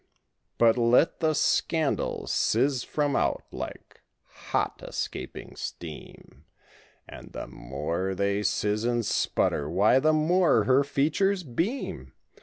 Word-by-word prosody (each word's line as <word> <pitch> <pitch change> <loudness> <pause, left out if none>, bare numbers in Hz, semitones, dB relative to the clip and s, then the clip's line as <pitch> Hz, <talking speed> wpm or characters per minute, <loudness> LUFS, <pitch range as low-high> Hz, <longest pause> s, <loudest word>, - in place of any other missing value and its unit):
But 115 +1 +4
let 120 +7 +3
the 155 -2 +1
scandals 155 0 0
sizz 130 +2 +1
from 145 -2 -1
out - - 0
like - - -8 0.5
hot - - -1
escaping - - -6
steam 80 -3 -9 0.6
And - - -12
the - - -5
more 80 +10 -4
they 100 +1 0
sizz 105 +1 0
and 120 -1 0
sputter 75 -6 0
why 100 +9 +4
the 155 +3 +3
more 155 - +3
her 130 +5 +4
features 160 +8 +1
beam. 170 - -3
125 Hz, 115 wpm, -27 LUFS, 105-155 Hz, 0.6 s, But